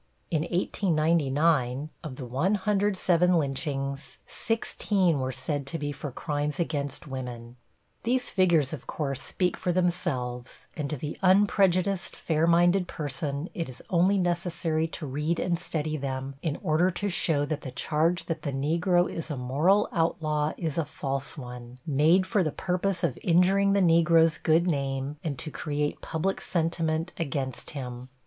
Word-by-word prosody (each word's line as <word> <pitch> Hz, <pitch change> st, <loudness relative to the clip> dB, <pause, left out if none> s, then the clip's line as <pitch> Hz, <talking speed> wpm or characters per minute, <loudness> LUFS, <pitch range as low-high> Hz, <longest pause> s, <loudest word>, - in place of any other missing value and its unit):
In 160 Hz, -3 st, +2 dB
1899, 155 Hz, -5 st, +1 dB
of 150 Hz, -5 st, -6 dB
the 130 Hz, -, -7 dB
107 185 Hz, -, +2 dB
lynchings, 140 Hz, -1 st, -3 dB
16 195 Hz, -7 st, 0 dB
were 130 Hz, 0 st, -1 dB
said 135 Hz, +2 st, -3 dB
to 150 Hz, -, -3 dB
be 145 Hz, -2 st, -3 dB
for 145 Hz, 0 st, -6 dB
crimes 145 Hz, +2 st, -2 dB
against 145 Hz, -3 st, -2 dB
women. 125 Hz, -3 st, -6 dB, 0.5 s
These 250 Hz, +2 st, +1 dB
figures, 170 Hz, -7 st, +3 dB
of 140 Hz, -, -7 dB
course, 135 Hz, -4 st, -3 dB
speak 180 Hz, -1 st, 0 dB
for 180 Hz, -, -1 dB
themselves, 130 Hz, -9 st, -2 dB
and 145 Hz, -3 st, -3 dB
to 150 Hz, -, -3 dB
the 150 Hz, +3 st, -6 dB
unprejudiced, 190 Hz, -1 st, +3 dB
fair 160 Hz, 0 st, +1 dB
minded 175 Hz, +2 st, +4 dB
person 145 Hz, +1 st, -3 dB
it 165 Hz, -5 st, -3 dB
is 125 Hz, -, -9 dB
only 185 Hz, +3 st, +4 dB
necessary 170 Hz, -3 st, 0 dB
to 160 Hz, -, -6 dB
read 150 Hz, +5 st, -1 dB
and 175 Hz, -2 st, 0 dB
study 155 Hz, -3 st, -2 dB
them 135 Hz, -1 st, -4 dB
in 155 Hz, -3 st, -1 dB
order 160 Hz, +4 st, +3 dB
to 185 Hz, +3 st, -2 dB
show 160 Hz, -6 st, +2 dB
that 150 Hz, +1 st, -3 dB
the 130 Hz, -, -6 dB
charge 155 Hz, +7 st, 0 dB
that 165 Hz, -2 st, -3 dB
the 145 Hz, -, -3 dB
Negro 170 Hz, +6 st, +2 dB
is 165 Hz, -1 st, -5 dB
a 145 Hz, -, -3 dB
moral 150 Hz, +11 st, +2 dB
outlaw 155 Hz, -2 st, 0 dB
is 160 Hz, -2 st, -2 dB
a -, -, +2 dB
false 140 Hz, -1 st, -4 dB
one, 125 Hz, -2 st, -9 dB
made 160 Hz, +5 st, +4 dB
for 205 Hz, +1 st, +1 dB
the 155 Hz, -4 st, 0 dB
purpose 185 Hz, +1 st, -1 dB
of 155 Hz, -7 st, 0 dB
injuring 195 Hz, +3 st, +4 dB
the 200 Hz, -, +3 dB
Negro's 165 Hz, -1 st, +4 dB
good 165 Hz, +2 st, +3 dB
name 140 Hz, -3 st, -1 dB
and 145 Hz, -5 st, -3 dB
to 155 Hz, -, -6 dB
create 145 Hz, 0 st, -2 dB
public 185 Hz, +5 st, -2 dB
sentiment 165 Hz, -1 st, -1 dB
against 135 Hz, -5 st, -3 dB
him. 125 Hz, -3 st, -6 dB
160 Hz, 155 wpm, -27 LUFS, 140-175 Hz, 0.5 s, minded